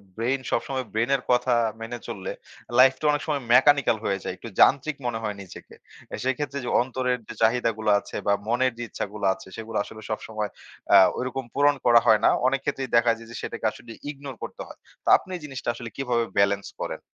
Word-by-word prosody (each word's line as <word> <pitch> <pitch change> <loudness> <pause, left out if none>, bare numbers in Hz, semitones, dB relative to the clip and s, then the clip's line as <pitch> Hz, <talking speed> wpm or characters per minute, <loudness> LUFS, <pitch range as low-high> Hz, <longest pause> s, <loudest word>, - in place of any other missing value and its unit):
brain 125 +4 0
সবসময় 130 -2 -1
brain 115 +3 0
এর 135 - -2
কথা 125 0 +3 0.3
মেনে 120 +2 -5
চললে 105 -5 -5 0.5
life 130 +1 +7
টা - - -5
অনেক 145 0 0
সময় 145 -3 0
mechanical 135 -2 +5
হয়ে 100 -1 0
যায়। - - -3
একটু 115 - -9
যান্ত্রিক 140 +1 +4
মনে 120 -2 -1
হয় 105 -1 -2
নিজেকে। 95 - -12 0.4
এ - - -1
সেক্ষেত্রে 135 +2 -2
যে, 120 - -3
অন্তরের 125 0 -1
যে, - - -7
চাহিদা 115 +1 +3
গুলো 110 -1 +1
আছে - - -11
বা 100 - +5
মনের 125 +3 +2
যে, 120 - -4
ইচ্ছাগুলো 105 0 -5
আছে 95 0 -13
সেগুলো 115 0 -5
আসলে 110 +1 -11
সবসময় 110 -1 -3 0.4
আ - - +10 0.2
ঐরকম 130 +1 -3
পূরণ 145 0 +4
করা 120 -1 +7
হয় 110 -2 +6
না। - - +7 0.2
অনেক 135 +1 +1
ক্ষেত্রেই 135 -1 -2
দেখা 115 0 +5
যায় 115 - -13
যে, - - -8
সেটাকে - - -5
আসলে 115 +2 -12 0.2
ignore 140 -3 -8
করতে - - -7
হয়। - - -12 0.3
তো - - -18
আপনি 185 - -10
জিনিসটা 135 -2 -5
আসলে 120 -1 -7
কিভাবে 125 -3 0 0.2
balance 100 0 +2
করেন? - - -4
120 Hz, 205 wpm, -25 LUFS, 110-135 Hz, 0.5 s, আ